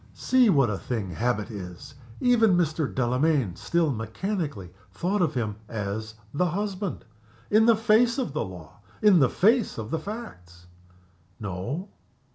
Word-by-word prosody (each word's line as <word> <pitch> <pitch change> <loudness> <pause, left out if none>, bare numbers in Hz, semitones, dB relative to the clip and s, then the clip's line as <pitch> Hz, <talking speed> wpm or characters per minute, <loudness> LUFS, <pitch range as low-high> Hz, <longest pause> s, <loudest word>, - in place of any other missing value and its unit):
(See 255 -3 +3
what 135 - +4
a 100 - -3
thing 110 -7 -3
habit 110 +2 -1
is! 90 -1 -8 0.3
Even 225 -6 +4
Mr. 155 -4 0
Delamayn 125 - +1
still 170 -4 0
mechanically 115 - -4 0.2
thought 180 - -1
of 170 - +1
him 110 -4 -2
as 110 +1 -4 0.2
the 180 +5 +1
husband 195 - -3 0.5
in 220 +2 +5
the 230 - +7
face 230 +2 +3
of 250 - -2
the 155 - -1
law! 90 -2 -10 0.2
in 205 -5 +7
the 135 -4 +4
face 225 +4 +2
of 110 0 -6
the 160 - 0
facts!) 90 - -9 0.7
No. 110 - -4
145 Hz, 145 wpm, -26 LUFS, -, 0.7 s, the